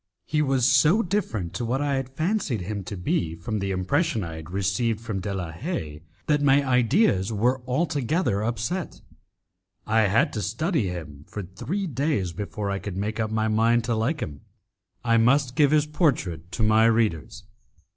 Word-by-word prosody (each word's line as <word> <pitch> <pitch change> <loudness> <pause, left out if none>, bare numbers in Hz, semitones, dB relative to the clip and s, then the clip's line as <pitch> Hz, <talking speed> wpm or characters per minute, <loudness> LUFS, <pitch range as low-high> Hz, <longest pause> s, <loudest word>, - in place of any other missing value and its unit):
He 150 +6 0
was 135 -4 +2
so 150 - +5
different 140 - -2
to 125 - -3
what 125 +3 0
I 145 -1 0
had 135 -1 -2
fancied 155 - -1
him 100 +2 -4
to 100 - -6
be 85 -2 -1
from 105 +6 -4
the 100 0 -2
impression 110 - 0
I 80 -2 -6
had 80 +1 -9
received 100 +4 0
from 110 -4 -4
De 100 +2 -4
la 90 -4 -4
Haye, 80 - -5 0.2
that 150 -1 +2
my 140 0 +4
ideas 125 - +3
were 125 +5 +1
altogether 140 - 0
upset. 120 - -3 0.8
I 110 0 +3
had 105 +4 +2
to 110 - -2
study 125 - 0
him; 80 -5 -7
for 105 - -6
three 145 - -4
days 135 - -1
before 100 +2 -4
I 100 - -2
could 95 -2 -6
make 105 +3 -3
up 110 -1 0
my 110 0 0
mind 115 +2 +3
to 120 0 -1
like 130 +8 -1
him. 70 -2 -5 0.6
I 115 -1 +3
must 125 +2 +3
give 150 -3 +5
his 150 0 +3
portrait 125 - -1
to 110 - -1
my 110 +1 +5
readers. 105 - +1
115 Hz, 180 wpm, -25 LUFS, 95-140 Hz, 0.8 s, so